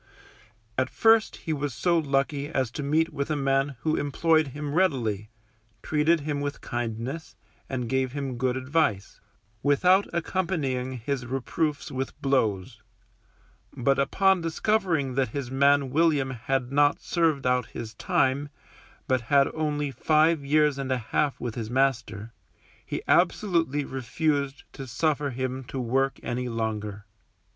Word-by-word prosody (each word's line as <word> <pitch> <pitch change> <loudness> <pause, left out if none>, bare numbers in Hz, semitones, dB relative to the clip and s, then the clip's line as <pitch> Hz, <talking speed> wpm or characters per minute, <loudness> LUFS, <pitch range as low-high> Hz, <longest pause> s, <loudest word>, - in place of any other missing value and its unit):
At 130 0 +1
first 225 -1 +4
he 160 - -4
was 145 -4 -3
so 175 +8 +2
lucky 140 0 0
as 130 -6 -1
to 145 - -5
meet 155 +3 +1
with 140 0 -3
a 155 - +1
man 135 0 +1
who 155 +4 0
employed 155 +2 +2
him 145 +2 -5
readily, 120 - +1 0.5
treated 155 +1 +2
him 145 -1 -2
with 145 0 -3
kindness, 120 +6 -4 0.3
and 125 -3 -3
gave 130 0 0
him 135 -4 -4
good 130 0 0
advice, 130 -7 -1 0.4
without 180 +7 +4
accompanying 160 -8 -1
his 125 +1 -3
reproofs 140 +4 -2
with 135 0 -4
blows; 115 -5 0 1.0
but 135 +3 +2
upon 190 +6 +3
discovering 165 -5 0
that 130 0 +1
his 130 -3 -4
man 140 0 +3
William 150 -3 +2
had 130 +1 -2
not 145 +1 +3
served 160 -6 0
out 125 -1 +2
his 115 -1 -7
time, 135 +5 0 0.6
but 130 -1 +2
had 140 -1 +5
only 150 -2 -1
five 155 +2 +2
years 150 0 +2
and 135 -1 -3
a 130 - +2
half 135 +4 -1
with 120 -2 -4
his 110 -2 -5
master, 125 -4 0 0.5
he - - -5
absolutely 165 -8 +2
refused 140 +2 -1
to 135 - -8
suffer 145 +3 0
him 130 +1 -3
to 130 - -5
work 135 +3 0
any 125 0 -2
longer. 105 -3 -3
140 Hz, 140 wpm, -26 LUFS, 125-155 Hz, 1.0 s, had